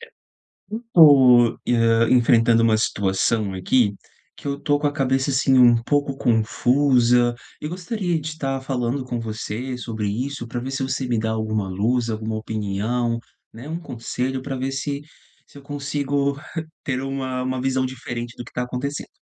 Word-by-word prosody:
Eu 460 +1 -16 0.7
tô, 130 -7 +7
hã, 115 -1 +3
enfrentando 115 -2 +4
uma 115 -1 +4
situação 100 0 0
aqui, 100 +3 +2 0.4
que - - -11
eu 140 0 -1
estou 145 0 +1
com 145 - -1
a 145 - +1
cabeça, 135 -1 0
assim, 135 0 +3
um 120 -1 +7
pouco 140 +1 0
confusa 120 +1 +3 0.3
e 150 - -4
gostaria 180 0 -2
de 155 +1 -6
tá 135 -2 -1
falando 130 0 -2
com 125 -2 -3
você 115 +3 -4
sobre 110 -4 -4
isso, 125 +4 -3
para 120 +1 -4
ver 130 - -5
se 135 0 -3
você 130 0 -2
me 120 -2 0
dá 110 0 -1
alguma 110 -3 -2
luz, 115 +6 0
alguma 110 0 -3
opinião, 110 +2 -2 0.3
né. 120 +6 -10
Um 165 - -3
conselho 130 -2 -4
para 135 0 -4
ver 130 +1 -3
se 140 +1 -3 0.4
se - - -20
eu 140 - -11
consigo 140 0 -2 0.5
ter 130 -2 -1
uma 135 -1 -3
uma 130 0 -2
visão 130 0 0
diferente 120 -2 -6
do 120 - -7
que - - -13
está 125 - -3
acontecendo. 130 +3 -4
125 Hz, 170 wpm, -22 LUFS, 115-140 Hz, 0.7 s, tô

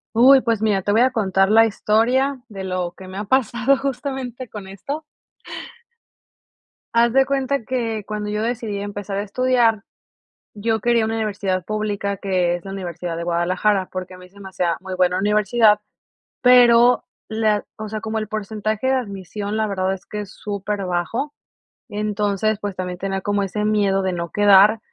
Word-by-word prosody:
Uy, 260 +3 +7
pues 230 -3 0
mira, 205 -4 +1
te 205 - -1
voy 225 +3 +4
a 260 0 +3
contar 195 -2 +2
la 225 +1 +7
historia 245 +6 +1
de 195 -3 -7
lo 180 -2 -2
que 190 - -11
me 185 - -9
ha 205 - -2
pasado 245 +3 +2
justamente 265 -2 -4
con 210 -3 -8
esto. 275 - -6 1.9
Haz 235 0 +4
de 270 +1 +5
cuenta 275 0 -1
que 230 -4 -2
cuando 210 0 -4
yo 210 +1 -2
decidí 225 -3 -2
empezar 205 -1 -5
a 200 - -1
estudiar, 230 -1 +1 0.7
yo 220 +2 0
quería 235 0 +2
una 225 - -2
universidad 200 -4 -1
pública, 205 0 -2
que 180 -3 0
es 175 - -9
la 195 - -6
Universidad 175 -3 -5
de 170 - -4
Guadalajara, 180 +3 +1
porque 185 0 -6
a - - -13
mí 180 0 -13
se 200 +2 -19
me 195 - -9
hacía 175 -2 0
muy 190 0 -6
buena 180 0 +2
universidad, 210 +1 +3 0.6
pero 245 -1 +6 0.2
la 220 -1 0
o 215 0 -6
sea, 215 +1 -4
como 220 0 -3
el 215 -1 -5
porcentaje 215 +2 -2
de 265 - +3
admisión, 205 -3 -3
la 220 0 +1
verdad 190 -1 -1
es 190 - -9
que 210 - -5
es 205 0 -9
superbajo. 205 - -3 0.6
Entonces, 210 0 -1
pues 205 -2 -4
también 180 -1 -5
tenía 195 0 -2
como 205 +1 0
ese 210 +2 -2
miedo 200 -2 +2
de 185 -1 -1
no 170 -1 -4
quedar, 205 +2 +5
210 Hz, 175 wpm, -21 LUFS, 195-230 Hz, 1.9 s, Uy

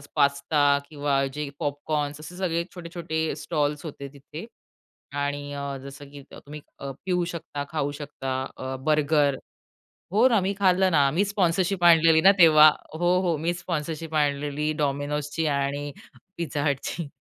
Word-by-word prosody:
Pasta 140 0 +3
किंवा 145 -2 0
जे 150 -1 -4
popcorn 145 0 -2
असे 155 +4 -10
सगळे 170 -3 -1
छोटे-छोटे 170 -2 -3
स्टॉल्स 150 -2 -2
होते 140 -2 -7
तिथे. 145 +6 -10 0.7
आणि 145 0 -3 0.3
जसं 140 +1 -10
की 140 -1 -11
तुम्ही 150 +1 -10 0.2
पिऊ 175 +6 -2
शकता, 165 -4 -5
खाऊ 145 -3 -1
शकता, 140 -2 -5 0.2
अ, 130 0 -5
बर्गर. 150 -2 +3 0.8
हो, 220 +5 +5
ना 225 -5 +3
मी 190 +1 -1
खाल्लं 185 -1 +3
ना. 145 -5 +4
मी 180 +8 +1
स्पॉन्सरशिप 185 -2 0
आणलेली 165 -1 +6
ना 195 +4 +7
तेव्हा. 155 -3 +8 0.3
हो, 175 +1 +3
हो 170 -3 +1
मी 165 +3 0
स्पॉन्सरशिप 160 -2 -4
आणलेली 145 +1 0
Domino'sची 145 +2 -1
आणि 140 +1 -2 0.5
Pizza 145 -3 -2
Hutची. 145 +4 -3
150 Hz, 135 wpm, -25 LUFS, 145-170 Hz, 0.8 s, तेव्हा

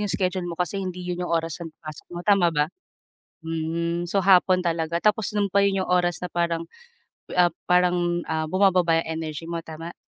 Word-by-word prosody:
'yong 205 - -1
schedule 185 -2 -1
mo 170 - -5
kasi 180 +2 -2
hindi 180 -1 -5
'yon 180 0 -3
yung 180 - -3
oras 165 +1 -3
ng 165 - -5 0.2
pasok 155 -1 -9
mo 175 - -6
tama 195 -4 +4
ba? 150 -3 +2 0.8
Hmm, 165 +1 -2
so 185 +3 0
hapon 185 -1 +5
talaga, 170 -1 -1
tapos 210 +1 +1
noon 205 -1 +1
pa 200 +1 +2
'yon 195 -1 +2
yung - - -4
oras 175 -2 +2
na 180 - -4
parang, 170 -1 -1 0.7
ah, 175 -1 +4 0.2
parang 175 -1 +2
ah, 160 -1 -2
bumababa 185 -3 +3
'yang 160 0 -3
energy 155 0 -5
mo, 170 0 -4
tama? 165 +1 -8
175 Hz, 195 wpm, -24 LUFS, 165-185 Hz, 0.8 s, hapon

